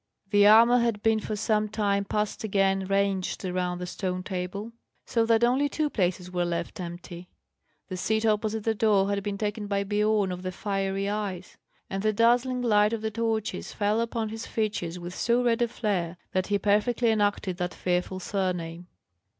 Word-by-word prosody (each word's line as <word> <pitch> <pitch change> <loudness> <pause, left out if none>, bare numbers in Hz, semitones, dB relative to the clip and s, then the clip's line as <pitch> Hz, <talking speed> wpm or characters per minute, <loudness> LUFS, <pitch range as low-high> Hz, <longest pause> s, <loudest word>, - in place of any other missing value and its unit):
The 205 -1 +6
armour 230 +3 +7
had 230 -3 0
been 220 -1 +3
for 215 - -4
some 215 0 0
time 200 -2 0
past 210 +2 -2
again 195 -2 +1
ranged 195 -1 0
round 180 -1 -2
the 180 - -4
stone 185 0 -3
table, 190 +4 -4 0.3
so 230 -1 +1
that 230 0 +3
only 260 +4 +3
two 300 +1 -1
places 180 -2 -1
were 180 -1 0
left 170 0 -3
empty. 175 0 -8 0.6
The 185 - -5
seat 220 +4 0
opposite 215 0 0
the 225 - +1
door 205 -3 +3
had 200 0 0
been 200 0 -3
taken 210 0 -3
by 200 -1 0
Biorn 210 -1 +1
of 180 0 -5
the 185 0 -3
Fiery 195 0 -2
Eyes; 200 -3 -4 0.3
and 195 0 -3
the 215 +1 +1
dazzling 245 +3 +2
light 210 -2 +3
of 225 -1 -3
the 220 - -1
torches 220 0 -2
fell 210 +2 +1
upon 230 -1 -2
his 225 +1 -6
features 205 -6 -2
with 175 0 -7
so 235 +5 +1
red 235 -1 +2
a 240 - +3
flare, 185 -7 -2
that 185 0 0
he 205 - +2
perfectly 215 +4 +2
enacted 205 -4 0
that 180 -1 -3
fearful 180 +1 -1
surname. 180 -3 -3
205 Hz, 185 wpm, -27 LUFS, 185-220 Hz, 0.6 s, armour